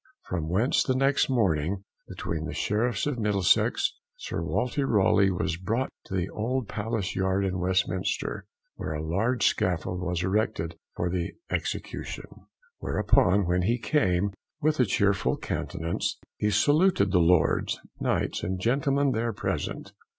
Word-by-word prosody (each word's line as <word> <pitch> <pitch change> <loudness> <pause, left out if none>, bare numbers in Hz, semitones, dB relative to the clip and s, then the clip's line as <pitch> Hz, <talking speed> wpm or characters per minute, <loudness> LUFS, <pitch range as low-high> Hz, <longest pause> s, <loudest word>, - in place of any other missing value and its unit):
From 80 -4 -3
whence, 105 +9 +2
the 130 - +1
next 135 +1 +2
morning, 95 - +1 0.2
between 80 -1 -4
the - - -5
Sheriffs 115 +3 0
of 145 -4 -2
Middlesex, 105 - +2 0.2
Sir - - -4
Walter 125 +3 -1
Raleigh 100 -3 +4
was 90 -2 -1
brought 115 +9 -1 0.2
to 95 - -5
the 90 -1 0
old 120 +3 -2
Palace 105 -1 -3
Yard 95 +1 +1
in 95 -1 -1
Westminster, 95 0 -1 0.3
where - - -4
a 75 0 -3
large 110 +10 +1
scaffold 90 0 0
was 90 -1 -1
erected 95 -4 0 0.2
for 90 0 -1
the 90 -2 -2 0.2
execution. - - -3 0.5
Whereupon, 95 +2 +3
when 90 +1 +1
he 115 +7 +1
came, 100 - +1 0.3
with 155 0 +1
a 125 - +5
chearful 100 -1 +1
countenance, 85 -1 -3 0.2
he 105 - 0
saluted 145 - +3
the 90 - +4
Lords, 85 -2 +3 0.2
Knights, - - 0
and 95 +1 -2
gentlemen 140 +5 +2
there 115 -1 -1
present. - - -3
100 Hz, 145 wpm, -27 LUFS, 90-120 Hz, 0.5 s, a